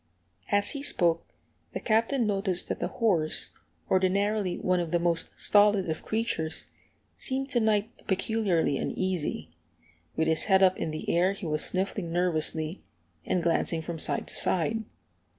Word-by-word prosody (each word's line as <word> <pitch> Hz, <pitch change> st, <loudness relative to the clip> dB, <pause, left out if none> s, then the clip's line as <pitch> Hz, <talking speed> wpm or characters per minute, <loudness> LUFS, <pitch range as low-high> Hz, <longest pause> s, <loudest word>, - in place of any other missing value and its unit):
As 205 Hz, 0 st, +2 dB
he 280 Hz, -, -4 dB
spoke 170 Hz, -, +2 dB, 0.5 s
the -, -, -3 dB
Captain 230 Hz, +3 st, +1 dB
noticed 195 Hz, -3 st, 0 dB
that -, -, -2 dB
the -, -, -1 dB
horse, 175 Hz, -9 st, 0 dB, 0.4 s
ordinarily 195 Hz, +1 st, +1 dB
one 185 Hz, -1 st, +1 dB
of 170 Hz, -2 st, -2 dB
the 175 Hz, -, +2 dB
most 170 Hz, -1 st, 0 dB
stolid 205 Hz, -2 st, +4 dB
of 155 Hz, -, -4 dB
creatures, 195 Hz, -8 st, -2 dB, 0.5 s
seemed 270 Hz, +1 st, -3 dB
to 245 Hz, -, +2 dB
night 220 Hz, 0 st, -1 dB
peculiarly 190 Hz, -7 st, +1 dB
uneasy; 165 Hz, -, -2 dB, 0.6 s
with 160 Hz, -, +1 dB
his 160 Hz, -1 st, +1 dB
head 195 Hz, -2 st, +4 dB
up 185 Hz, 0 st, +5 dB
in -, -, -2 dB
the 155 Hz, 0 st, -6 dB
air 180 Hz, +3 st, +3 dB
he 200 Hz, -1 st, -8 dB
was 155 Hz, -1 st, 0 dB
sniffing 190 Hz, -2 st, -2 dB
nervously, 165 Hz, -1 st, 0 dB, 0.5 s
and 180 Hz, -, 0 dB
glancing 165 Hz, -1 st, 0 dB
from 165 Hz, -1 st, -5 dB
side -, -, 0 dB
to -, -, -9 dB
side. 220 Hz, +6 st, +1 dB
185 Hz, 150 wpm, -28 LUFS, 165-210 Hz, 0.6 s, up